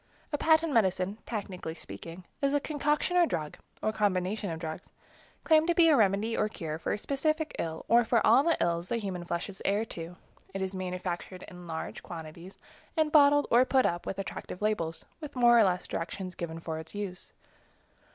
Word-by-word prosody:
A -, -, +2 dB
patent 320 Hz, -1 st, +3 dB
medicine, 190 Hz, -2 st, +1 dB
technically 190 Hz, -7 st, -5 dB
speaking, 170 Hz, +1 st, -9 dB, 0.2 s
is 280 Hz, 0 st, +2 dB
a -, -, +4 dB
concoction 295 Hz, +4 st, 0 dB
or 345 Hz, -1 st, +5 dB
drug, 155 Hz, -, -3 dB, 0.3 s
or 215 Hz, -, +1 dB
combination 200 Hz, -1 st, 0 dB
of 165 Hz, -, -3 dB
drugs, 160 Hz, +2 st, -6 dB, 0.5 s
claimed 315 Hz, 0 st, +4 dB
to 345 Hz, -, +2 dB
be 330 Hz, -1 st, +6 dB
a 305 Hz, -, +6 dB
remedy 215 Hz, +1 st, +2 dB
or 215 Hz, -, +1 dB
cure 160 Hz, -6 st, -5 dB
for -, -, -2 dB
a -, -, 0 dB
specific 310 Hz, +6 st, -1 dB
ill 160 Hz, -1 st, -4 dB
or 235 Hz, +1 st, +5 dB
for 230 Hz, 0 st, +2 dB
all -, -, +7 dB
of 285 Hz, -, +1 dB
the 335 Hz, -, +3 dB
ills 170 Hz, +1 st, 0 dB
that 235 Hz, -, 0 dB
the -, -, -1 dB
human 185 Hz, -4 st, -4 dB
flesh 170 Hz, 0 st, -2 dB
is 195 Hz, -2 st, -10 dB
heir 205 Hz, +3 st, +1 dB
to. 170 Hz, -4 st, -7 dB, 0.4 s
It 195 Hz, -, -1 dB
is 190 Hz, 0 st, -3 dB
manufactured 180 Hz, -1 st, -4 dB
in 180 Hz, -1 st, -11 dB
large 160 Hz, -1 st, -5 dB
quantities, 170 Hz, +2 st, -9 dB, 0.4 s
and 310 Hz, -1 st, +2 dB
bottled 290 Hz, -1 st, +6 dB
or 240 Hz, +2 st, +7 dB
put 260 Hz, 0 st, +3 dB
up 175 Hz, 0 st, -1 dB
with 195 Hz, -, -3 dB
attractive 195 Hz, -2 st, -6 dB
labels, 170 Hz, -7 st, -1 dB
with 300 Hz, -3 st, -8 dB
more 240 Hz, -1 st, +6 dB
or -, -, +7 dB
less 180 Hz, -2 st, 0 dB
directions 185 Hz, +2 st, -4 dB
given 165 Hz, -2 st, -5 dB
for 160 Hz, -1 st, -4 dB
its 160 Hz, +4 st, -10 dB
use. 195 Hz, -3 st, -5 dB
195 Hz, 200 wpm, -29 LUFS, 175-260 Hz, 0.5 s, all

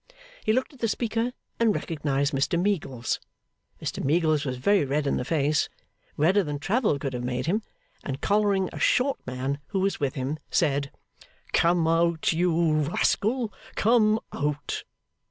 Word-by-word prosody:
He -, -, +2 dB
looked 260 Hz, +6 st, 0 dB
at 270 Hz, -, -17 dB
the 230 Hz, -, +1 dB
speaker 230 Hz, +2 st, -1 dB, 0.3 s
and 225 Hz, -3 st, +3 dB
recognised 145 Hz, -2 st, -1 dB
Mr 140 Hz, +6 st, +1 dB
Meagles. 145 Hz, -, -1 dB, 0.6 s
Mr -, -, -4 dB
Meagles 155 Hz, 0 st, +2 dB
was 130 Hz, -2 st, -2 dB
very 200 Hz, +8 st, +3 dB
red 145 Hz, +2 st, 0 dB
in 140 Hz, -, +1 dB
the -, -, -1 dB
face 150 Hz, +1 st, +1 dB, 0.5 s
redder 185 Hz, +7 st, +4 dB
than 145 Hz, -3 st, -3 dB
travel 205 Hz, -, +1 dB
could 135 Hz, -1 st, -4 dB
have 125 Hz, 0 st, -3 dB
made 125 Hz, 0 st, -2 dB
him 200 Hz, +7 st, +1 dB, 0.4 s
and 135 Hz, -1 st, -4 dB
collaring 200 Hz, 0 st, +2 dB
a -, -, -6 dB
short 265 Hz, +2 st, +2 dB
man 130 Hz, +3 st, -2 dB
who 195 Hz, -, -1 dB
was 195 Hz, 0 st, 0 dB
with 140 Hz, -3 st, -1 dB
him, 135 Hz, +4 st, -3 dB
said, 140 Hz, -1 st, +1 dB, 0.6 s
'come 170 Hz, -1 st, +3 dB
out, 165 Hz, 0 st, +2 dB
you 170 Hz, -1 st, +2 dB
rascal, 215 Hz, -, +1 dB, 0.2 s
come 220 Hz, -1 st, +4 dB
Out! 145 Hz, 0 st, -2 dB
160 Hz, 155 wpm, -26 LUFS, 140-205 Hz, 0.6 s, redder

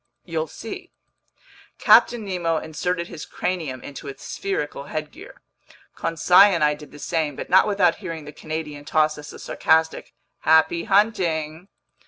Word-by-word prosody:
"You'll 160 Hz, -2 st, -2 dB
see." 355 Hz, -, -8 dB, 0.9 s
Captain 235 Hz, -3 st, +5 dB
Nemo 175 Hz, -4 st, -1 dB
inserted 170 Hz, +3 st, -3 dB
his 165 Hz, -4 st, -8 dB
cranium 155 Hz, -9 st, -4 dB
into 145 Hz, +1 st, -9 dB
its 135 Hz, -, -9 dB
spherical 150 Hz, -7 st, -4 dB
headgear. 155 Hz, 0 st, -8 dB, 0.5 s
Conseil 180 Hz, +4 st, +5 dB
and 165 Hz, -, 0 dB
I 150 Hz, 0 st, +4 dB
did 150 Hz, 0 st, -12 dB
the -, -, -12 dB
same, 155 Hz, -2 st, -2 dB
but -, -, -7 dB
not 190 Hz, +3 st, +6 dB
without 200 Hz, -5 st, +2 dB
hearing 165 Hz, -6 st, -7 dB
the 150 Hz, -, -10 dB
Canadian 155 Hz, -1 st, -6 dB
toss 155 Hz, 0 st, +1 dB
us 150 Hz, -, -9 dB
a -, -, -11 dB
sarcastic 160 Hz, 0 st, 0 dB, 0.2 s
"happy 160 Hz, +2 st, +3 dB
hunting." 180 Hz, -5 st, +1 dB
160 Hz, 145 wpm, -23 LUFS, 150-180 Hz, 0.9 s, not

